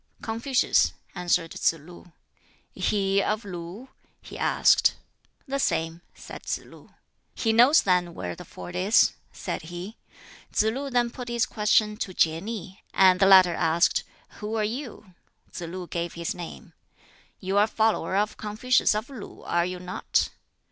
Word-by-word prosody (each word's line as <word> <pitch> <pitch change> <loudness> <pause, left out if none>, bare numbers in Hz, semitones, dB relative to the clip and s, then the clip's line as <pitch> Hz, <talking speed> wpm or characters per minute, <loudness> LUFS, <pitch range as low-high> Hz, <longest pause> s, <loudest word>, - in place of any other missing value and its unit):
"Confucius," 230 +4 +1 0.2
answered 175 -2 0
Tsz - - +2
lu. 175 +3 -14 0.6
"He 195 -1 +1
of 210 +2 -1
Lu?" 180 +6 -8 0.3
he - - -12
asked. - - +3 0.5
"The 275 +1 -2
same," 165 -8 -1
said - - -11
Tsz - - -3
lu. - - -17 0.4
"He 225 -1 +1
knows 250 +7 +6
then 180 -2 +1
where 90 -1 -5
the - - -10
ford 175 - -10
is," 195 +6 +4 0.2
said - - -5
he. 180 +5 -7 0.5
Tsz - - +2
lu 275 +4 -4
then 240 -2 +1
put 250 0 -8
his 235 -1 +1
question 210 0 +2
to 185 -3 -5
Kieh 160 0 +2
nih; 205 -3 -7 0.2
and 185 -1 +6
the 195 - +5
latter 185 -2 +7
asked, 165 +1 +2 0.4
"Who 215 +1 -4
are 220 - +1
you?" 220 -4 -5 0.4
Tsz - - -7
lu 180 +2 -6
gave 170 0 -4
his 170 0 -3
name. 175 -2 -9 0.7
"You 195 +1 0
are 205 - +6
a - - -6
follower 220 -3 0
of 210 +1 0
Confucius 215 +2 +1
of 215 +3 -3
Lu, 255 -7 -10
are 170 0 0
you 180 0 -5
not?" 180 0 -1
195 Hz, 160 wpm, -26 LUFS, 175-225 Hz, 0.7 s, latter